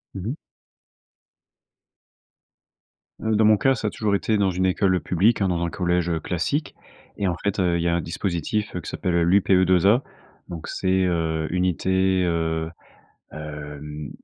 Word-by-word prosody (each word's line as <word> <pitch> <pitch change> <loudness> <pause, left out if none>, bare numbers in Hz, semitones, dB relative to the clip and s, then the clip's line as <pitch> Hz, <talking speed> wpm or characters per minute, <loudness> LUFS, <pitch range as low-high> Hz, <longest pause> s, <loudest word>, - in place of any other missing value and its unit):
Mmh 95 - -5
mh. 125 - -2 2.9
Heu, 110 -1 0
dans 110 +1 +4
mon 110 0 +6
cas, 135 +5 +3
ça 110 - -3
a - - +1
toujours 105 -1 0
été 110 +2 0
dans 100 -2 +2
une 90 +1 0
école 95 0 +2
publique, 100 +6 +2
hein, 100 - +3
dans 85 -1 0
un - - -2
collège 90 0 0
classique. 90 - -2 0.4
Et 100 - 0
en 90 - 0
fait, 100 0 -1
heu, 90 -2 +2
il 85 - -1
y - - +1
a 85 - +2
un 85 - 0
dispositif, 90 +5 -2
heu, 90 - -3
qui - - -7
s'appelle 90 -3 -2
l'UPE2A. 95 +3 +4 0.5
Donc 85 -2 -7
c'est, 95 0 0
heu, 80 -3 0
Unité, 95 +1 +1
heu, 80 -1 -1 0.6
hem, 75 -1 -7
90 Hz, 160 wpm, -23 LUFS, 85-100 Hz, 2.9 s, mon